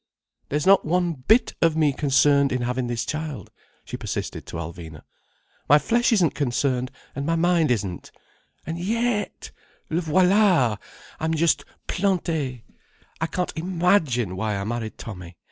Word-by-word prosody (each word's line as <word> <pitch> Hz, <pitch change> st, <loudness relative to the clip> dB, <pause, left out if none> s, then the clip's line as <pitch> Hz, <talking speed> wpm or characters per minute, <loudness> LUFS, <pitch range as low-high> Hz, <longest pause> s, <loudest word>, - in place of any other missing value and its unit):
"There's 150 Hz, +1 st, -1 dB
not 195 Hz, 0 st, +6 dB
one 175 Hz, +1 st, +1 dB
bit 195 Hz, -, +2 dB
of 165 Hz, -2 st, +3 dB
me 150 Hz, -3 st, +3 dB
concerned 140 Hz, 0 st, +3 dB
in 125 Hz, -1 st, -1 dB
having 125 Hz, +1 st, -1 dB
this 120 Hz, -1 st, -2 dB
child," 155 Hz, -2 st, -5 dB, 0.3 s
she -, -, -6 dB
persisted -, -, -5 dB
to -, -, -8 dB
Alvina. 80 Hz, -1 st, -8 dB, 0.7 s
"My 145 Hz, -, +8 dB
flesh 240 Hz, -, +2 dB
isn't 185 Hz, -9 st, +3 dB
concerned, 130 Hz, -2 st, 0 dB, 0.3 s
and 140 Hz, -, -3 dB
my 165 Hz, +3 st, 0 dB
mind 170 Hz, -2 st, +2 dB
isn't. 100 Hz, -7 st, -2 dB, 0.6 s
And 165 Hz, +2 st, -4 dB
yet!—le 210 Hz, -5 st, -3 dB
voilà!—I'm 165 Hz, -, +1 dB
just 165 Hz, +1 st, +2 dB, 0.2 s
planté. 160 Hz, -, -1 dB, 0.6 s
I 160 Hz, -, +1 dB
can't 180 Hz, +1 st, -3 dB
imagine 165 Hz, -, +1 dB
why 105 Hz, +2 st, -2 dB
I 100 Hz, -, -3 dB
married 110 Hz, +1 st, -4 dB
Tommy. 90 Hz, -5 st, -9 dB
150 Hz, 135 wpm, -24 LUFS, 120-175 Hz, 0.7 s, My